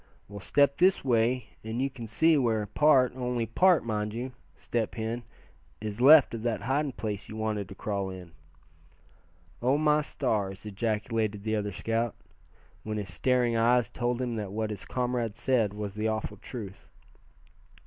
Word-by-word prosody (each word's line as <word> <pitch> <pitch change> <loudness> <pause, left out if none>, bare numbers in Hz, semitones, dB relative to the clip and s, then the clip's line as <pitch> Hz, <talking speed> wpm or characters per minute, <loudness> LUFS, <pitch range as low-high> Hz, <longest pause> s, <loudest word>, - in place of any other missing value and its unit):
Well, 100 0 -8
step 140 +7 +2
this 185 -4 +3
way 120 -1 +1
and 110 +2 -4
you 135 +1 0
can 120 -3 -8
see 160 +9 +3
where 115 -6 +1
part, 130 +1 +4
only 125 -2 -1
part, 170 - +3
mind 105 -1 -2
you, 125 +2 -4 0.3
Step 115 -3 -2
Hen, 115 +1 -3 0.6
is 105 +1 -5
left 145 0 +8
of 115 - -4
that 115 -1 -1
hiding 135 +2 0
place 105 -3 -5
you 110 - -7
wanted 110 -3 -2
to 95 - -9
crawl 100 -1 -3
in." 90 -2 -9 1.3
"Oh! 130 +4 +3
my 150 0 +3
stars!" 105 -10 -2
ejaculated 105 0 -2
the 110 0 0
other 105 -1 -2
scout, 115 +4 -1 0.7
when 110 0 -4
his 95 -4 -5
staring 125 +2 +2
eyes 120 +1 +3
told 120 0 -1
him 120 -3 -2
that 105 -3 -4
what 110 +1 -2
his 100 -2 -6
comrade 120 -3 -2
said 120 -4 +1
was 105 -1 -5
the 105 +1 -1
awful 110 -1 -3
truth. 105 -7 -9
115 Hz, 165 wpm, -28 LUFS, 105-125 Hz, 1.3 s, left